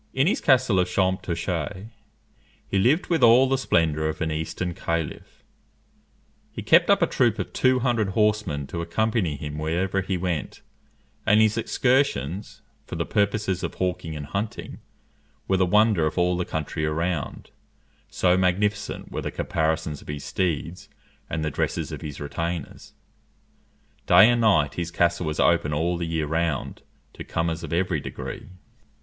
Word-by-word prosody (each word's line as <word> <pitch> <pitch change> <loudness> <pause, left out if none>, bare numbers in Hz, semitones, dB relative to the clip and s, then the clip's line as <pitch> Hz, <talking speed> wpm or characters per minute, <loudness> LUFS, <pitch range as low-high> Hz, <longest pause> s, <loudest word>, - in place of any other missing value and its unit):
In 135 +1 +3
his 210 - +1
castle 130 - +3
of 90 - +2
Champtocé 95 +1 -2 0.8
he 100 - 0
lived 140 - +3
with 165 -4 0
all 120 +3 +7
the 135 - +2
splendour 80 - +1
of 80 - -4
an 80 -1 -1
eastern 80 +3 -3
caliph. 85 -2 -4 1.1
He - - -7
kept - - +5
up - - +5
a - - +6
troop - - +1
of - - -5
two 130 0 +2
hundred 115 -5 +1
horsemen 105 -8 0
to 85 - -2
accompany 95 -1 0
him 75 +1 -6
wherever 90 +5 0
he 95 0 -2
went; 85 -4 -3 0.6
and 105 +1 +4
his 110 0 +4
excursions 115 - 0 0.2
for - - -6
the - - -2
purposes 100 -2 0
of - - -4
hawking 90 -3 -2
and 75 -1 -6
hunting 100 +8 -5 0.7
were 95 - +2
the 95 -1 +2
wonder 105 -4 +3
of 80 - -5
all 90 0 +2
the 90 0 -2
country 80 0 -3
around, 80 0 -2 0.6
so 90 -1 +2
magnificent 95 +3 -1
were - - -3
the - - -3
caparisons 80 -2 -2
of - - -17
his 75 -1 -5
steeds 85 -1 -3 0.4
and 80 -1 -2
the 75 - -1
dresses - - -2
of - - -6
his 75 -2 -7
retainers. 85 +2 -5 1.1
Day 95 +6 +8
and 120 0 +1
night 75 -11 +3
his 85 +1 -3
castle 85 0 +1
was 75 - -3
open 80 -3 +2
all 85 +4 0
the 85 -1 -3
year 80 -2 -1
round 80 -2 -2 0.3
to - - -8
comers 80 0 -2
of - - -6
every 90 -1 0
degree. - - -7
90 Hz, 160 wpm, -24 LUFS, 80-105 Hz, 1.1 s, Day